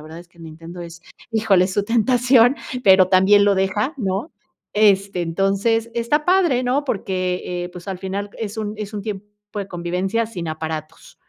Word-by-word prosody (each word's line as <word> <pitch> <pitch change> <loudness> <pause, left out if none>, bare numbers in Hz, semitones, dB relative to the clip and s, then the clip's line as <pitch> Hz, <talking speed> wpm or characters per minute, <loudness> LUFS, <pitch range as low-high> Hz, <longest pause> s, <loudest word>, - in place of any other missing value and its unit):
verdad 160 +2 -10
es 175 0 -14
que 170 - -27
el 165 - -11
Nintendo 165 +2 -10
es 170 0 -10 0.3
híjole, 215 -5 +3
es 185 - -6
su 205 - +1
tentación, 245 +3 +4 0.3
pero 190 -1 +6
también 195 +2 +5
lo 205 -1 +4
deja, 200 +8 0
¿no? 200 - -2 0.4
Este, 200 -3 +3
entonces, 200 +6 0
está 240 +6 0
padre, 350 -9 +3
¿no? 265 +4 0
Porque, 185 -5 -2
eh, - - -6
pues, 175 +1 -11
al 190 -2 -4
final 200 +2 -4
es 215 -1 -5
un 210 -1 -3
es 210 0 -6
un 205 - -4
tiempo 205 -1 -5 0.3
de 200 -1 -4
convivencia 180 +6 -2
sin 175 -7 -6
aparatos. 155 0 -6
195 Hz, 180 wpm, -21 LUFS, 180-225 Hz, 0.4 s, pero